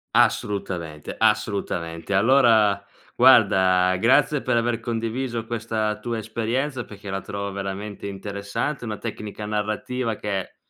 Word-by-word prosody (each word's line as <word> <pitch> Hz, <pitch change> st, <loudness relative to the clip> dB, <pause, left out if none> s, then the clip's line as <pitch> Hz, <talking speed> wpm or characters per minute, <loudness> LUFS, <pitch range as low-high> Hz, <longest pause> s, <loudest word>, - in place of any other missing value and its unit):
Assolutamente, 85 Hz, -7 st, 0 dB
assolutamente. 100 Hz, -5 st, 0 dB
Allora, 110 Hz, -3 st, +4 dB, 0.3 s
guarda, 95 Hz, -1 st, +5 dB
grazie 135 Hz, +7 st, +3 dB
per 120 Hz, -, +1 dB
aver 115 Hz, 0 st, 0 dB
condiviso 115 Hz, +1 st, -3 dB
questa 110 Hz, -2 st, -2 dB
tua 115 Hz, +1 st, -3 dB
esperienza 120 Hz, +4 st, -2 dB
perché 100 Hz, -2 st, -9 dB
la 95 Hz, 0 st, -2 dB
trovo 100 Hz, 0 st, -5 dB
veramente 100 Hz, +1 st, -5 dB
interessante, 100 Hz, +7 st, -4 dB
una 105 Hz, -1 st, -4 dB
tecnica 105 Hz, -2 st, -6 dB
narrativa 110 Hz, +3 st, -2 dB
che, 100 Hz, -3 st, -4 dB
105 Hz, 110 wpm, -24 LUFS, 100-115 Hz, 0.3 s, guarda